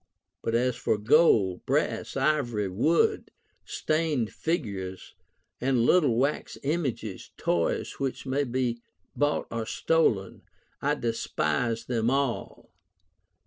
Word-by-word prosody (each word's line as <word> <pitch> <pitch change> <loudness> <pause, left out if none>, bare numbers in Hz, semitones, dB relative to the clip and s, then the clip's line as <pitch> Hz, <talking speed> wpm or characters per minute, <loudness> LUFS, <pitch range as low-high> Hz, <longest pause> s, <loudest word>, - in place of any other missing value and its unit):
But 115 - -1
as 125 +1 +2
for - - 0
gold, 105 - +4
brass, - - 0
ivory, 130 -8 +1
wood, 150 - +2 0.4
stained 155 -8 -1
figures, 100 - -3 0.5
and 125 -2 +2
little 150 -9 +4
wax 140 +4 -1
images, 135 - -2
toys 85 -1 -1
which 135 -1 -3
may 135 +2 0
be 120 -2 -1 0.3
bought 145 0 +1
or 115 -1 -3
stolen, 110 - +1 0.4
I 145 +1 +1
despise 115 - -1
them 115 -2 0
all." 135 -2 -2
120 Hz, 105 wpm, -27 LUFS, 110-145 Hz, 0.5 s, gold